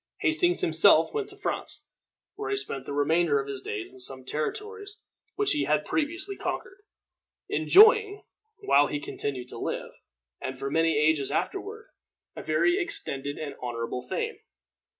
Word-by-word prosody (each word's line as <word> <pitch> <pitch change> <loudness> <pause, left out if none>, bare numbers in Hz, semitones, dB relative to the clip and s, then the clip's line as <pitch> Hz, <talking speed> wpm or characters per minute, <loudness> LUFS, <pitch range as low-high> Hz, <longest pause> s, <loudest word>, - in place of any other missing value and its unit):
Hastings 350 +3 +2
himself - - +5
went 425 -2 -2
to 400 - -11
France, 410 - -4 0.5
where 420 +1 -5
he 405 - 0
spent 135 - -4
the - - -4
remainder 150 0 +2
of 135 - -4
his 135 -1 -5
days 105 -2 -5
in 130 - -14
some 130 0 -2
territories 420 - -4 0.4
which 415 0 +1
he 300 - +1
had 150 0 +1
previously 340 +6 -2
conquered, 385 +1 -5 0.7
enjoying, 425 0 +5 0.4
while 145 - +4
he 145 - -3
continued 135 -3 -4
to - - -8
live, - - -4 0.5
and 130 0 -4
for 135 +1 -4
many 165 -1 +2
ages 150 -2 +2
afterward, 420 +3 -3 0.5
a - - -6
very 375 +1 +2
extended 245 - -2
and 150 -2 -5
very - - -15
honorable 120 0 -3
fame. 125 - -4
165 Hz, 155 wpm, -27 LUFS, -, 0.7 s, himself